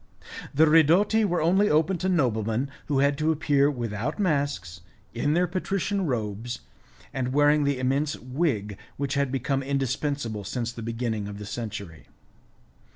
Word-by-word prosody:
The 155 +3 +5
ridotti 165 +8 +5
were 175 -4 0
only 190 +5 +3
open 160 +4 +2
to 185 - 0
noblemen 125 - 0 0.2
who 145 - 0
had 140 +1 +2
to 155 +1 +2
appear 145 -2 +2
without 120 +1 -3
masks, 140 - -1 0.3
in 145 +6 0
their 180 +1 +3
patrician 195 +1 -1
robes, 115 -1 -3 0.5
and 130 -1 -2
wearing 145 +1 +4
the 140 -1 +1
immense 135 +4 0
wig 125 - -2 0.2
which 140 -1 -2
had 140 -2 0
become 135 +1 -1
indispensable 135 -4 -2
since 115 +4 -3
the 115 - -8
beginning 115 -2 -3
of 100 0 -7
the 105 - -7
century. 100 -7 -6
140 Hz, 150 wpm, -26 LUFS, 115-155 Hz, 0.5 s, The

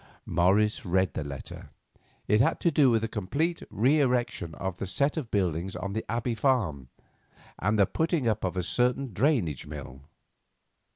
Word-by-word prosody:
Morris 100 +8 +2
read 95 - +1
the 80 - -3
letter. 70 -2 -8 0.6
It 105 +1 +4
had - - +2
to 170 - +3
do 140 -3 +5
with 115 -2 +2
the - - 0
complete 140 - -2
reerection 125 - +1
of 95 -1 -5
a 95 - -2
set 140 +9 +1
of 150 -8 -4
buildings 95 -2 -1
on 100 0 -4
the 110 - -2
Abbey 120 +1 -1
farm, 105 - 0 0.7
and 105 +4 +1
the 100 - +5
putting 160 - 0
up 110 -1 0
of 95 0 -2
a 90 - 0
certain 125 +5 0
drainage 105 - +1
mill. 65 +1 -8
105 Hz, 165 wpm, -28 LUFS, 90-125 Hz, 0.7 s, do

